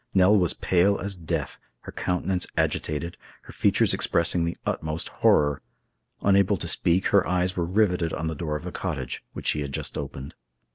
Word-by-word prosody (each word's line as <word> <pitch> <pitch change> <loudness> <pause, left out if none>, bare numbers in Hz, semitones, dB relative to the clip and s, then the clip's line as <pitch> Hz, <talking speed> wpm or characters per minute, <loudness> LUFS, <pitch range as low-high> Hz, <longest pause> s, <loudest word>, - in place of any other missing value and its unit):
Nell 95 +2 +6
was 90 -5 +4
pale 95 +2 +2
as 100 0 -3
death, 80 -5 -4 0.2
her - - -9
countenance 90 0 -1
agitated, 80 +3 -1 0.3
her - - -12
features - - +2
expressing 85 0 +1
the 85 - -3
utmost 80 +1 -2
horror. 75 -2 +3 0.6
Unable 100 -1 +3
to - - -3
speak, 90 +3 +2
her 100 -2 +3
eyes 90 +1 0
were 85 - -1
riveted 90 -3 +1
on 80 - -3
the 80 - -2
door 75 0 -3
of 75 - -5
the 90 - -5
cottage, 70 -11 -4
which - - -8
she 75 - +2
had 70 -1 -4
just - - -4
opened. 65 +2 -7
85 Hz, 180 wpm, -25 LUFS, 80-95 Hz, 0.6 s, Nell